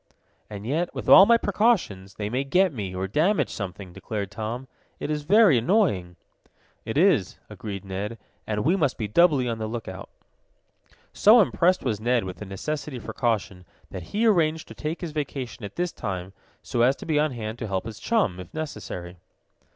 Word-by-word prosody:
"And 105 Hz, -1 st, -8 dB
yet, 160 Hz, +8 st, -1 dB
with -, -, -5 dB
all 195 Hz, -, +9 dB
my 235 Hz, 0 st, +6 dB
precautions, 195 Hz, -, 0 dB
they 105 Hz, -, -3 dB
may 125 Hz, +5 st, -1 dB
get 180 Hz, +5 st, +2 dB
me, 100 Hz, -6 st, -5 dB
or 95 Hz, +1 st, -2 dB
damage 165 Hz, -, +1 dB
something," 95 Hz, -2 st, -6 dB
declared 100 Hz, -1 st, -5 dB
Tom. 115 Hz, +5 st, -5 dB, 0.3 s
"It 150 Hz, -, -3 dB
is 150 Hz, -1 st, -1 dB
very 200 Hz, -, +6 dB
annoying!" 115 Hz, -, +1 dB, 0.7 s
"It -, -, -3 dB
is," -, -, +3 dB
agreed 100 Hz, -3 st, -7 dB
Ned, 100 Hz, +4 st, -4 dB, 0.3 s
"and 105 Hz, +1 st, -2 dB
we 170 Hz, +5 st, +4 dB
must 150 Hz, -8 st, 0 dB
be 110 Hz, -, -3 dB
doubly 145 Hz, -, +4 dB
on 115 Hz, -1 st, -2 dB
the 110 Hz, -, -3 dB
lookout." 110 Hz, -5 st, -6 dB, 1.0 s
So 220 Hz, +4 st, +6 dB
impressed 185 Hz, -3 st, +3 dB
was 110 Hz, -5 st, -2 dB
Ned 120 Hz, +1 st, +2 dB
with 95 Hz, -1 st, -6 dB
the 105 Hz, -, -8 dB
necessity 145 Hz, +8 st, -4 dB
for 120 Hz, -, -7 dB
caution 105 Hz, -6 st, -1 dB, 0.3 s
that 95 Hz, -, -6 dB
he 220 Hz, +3 st, 0 dB
arranged 160 Hz, -7 st, +2 dB
to -, -, -8 dB
take 155 Hz, +2 st, -5 dB
his 170 Hz, -3 st, -4 dB
vacation 135 Hz, -6 st, -5 dB
at 100 Hz, -, -7 dB
this 175 Hz, 0 st, -1 dB
time, 95 Hz, -2 st, -5 dB, 0.3 s
so 120 Hz, -, -1 dB
as 130 Hz, +3 st, +4 dB
to -, -, -10 dB
be 155 Hz, -2 st, +1 dB
on 150 Hz, -2 st, +1 dB
hand 110 Hz, -1 st, -5 dB
to 110 Hz, -, -4 dB
help 95 Hz, +1 st, -2 dB
his 110 Hz, -2 st, -7 dB
chum, 200 Hz, -, 0 dB
if 90 Hz, 0 st, -9 dB
necessary. 100 Hz, -, -6 dB
120 Hz, 190 wpm, -25 LUFS, 100-160 Hz, 1.0 s, all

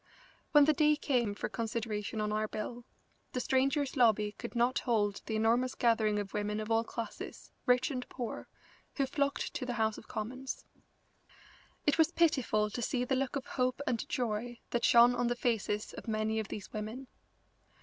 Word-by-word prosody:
When 295 Hz, -1 st, +7 dB
the 310 Hz, -, +4 dB
day 300 Hz, 0 st, +4 dB
came 245 Hz, -8 st, 0 dB
for -, -, -3 dB
consideration 220 Hz, -2 st, -3 dB
on 210 Hz, 0 st, -1 dB
our 215 Hz, 0 st, 0 dB
bill, 235 Hz, +3 st, -5 dB, 0.5 s
the 250 Hz, -, -1 dB
Strangers' 275 Hz, +3 st, +1 dB
Lobby 220 Hz, -5 st, +4 dB
could 235 Hz, +3 st, -8 dB
not 240 Hz, +2 st, +2 dB
hold 205 Hz, -5 st, 0 dB
the 220 Hz, -, -1 dB
enormous 235 Hz, +4 st, +2 dB
gathering 220 Hz, -3 st, +2 dB
of 205 Hz, -1 st, -3 dB
women 210 Hz, 0 st, -1 dB
of 215 Hz, +1 st, -4 dB
all 225 Hz, 0 st, +3 dB
classes, 230 Hz, 0 st, -7 dB, 0.2 s
rich 250 Hz, +2 st, +3 dB
and 250 Hz, -2 st, -4 dB
poor, 245 Hz, -3 st, -5 dB, 0.5 s
who 275 Hz, -, +2 dB
flocked 280 Hz, +1 st, -1 dB
to -, -, -3 dB
the 250 Hz, -1 st, -2 dB
House 220 Hz, -2 st, 0 dB
of -, -, -16 dB
Commons. 255 Hz, +5 st, -5 dB, 1.2 s
It 295 Hz, +2 st, +2 dB
was 320 Hz, +1 st, +5 dB
pitiful 250 Hz, -11 st, +2 dB
to 240 Hz, -, -4 dB
see 245 Hz, +2 st, 0 dB
the 265 Hz, -, +1 dB
look 265 Hz, +1 st, -1 dB
of 275 Hz, -1 st, -3 dB
hope 255 Hz, -1 st, -1 dB
and 235 Hz, -3 st, -1 dB
joy 240 Hz, 0 st, -2 dB
that 240 Hz, -, 0 dB
shone 240 Hz, +1 st, +7 dB
on 245 Hz, 0 st, 0 dB
the 240 Hz, -, 0 dB
faces 220 Hz, -3 st, -1 dB
of -, -, -9 dB
many 220 Hz, 0 st, 0 dB
of 215 Hz, -, -3 dB
these 205 Hz, -1 st, -7 dB
women. 220 Hz, +5 st, -5 dB
235 Hz, 180 wpm, -32 LUFS, 215-255 Hz, 1.2 s, When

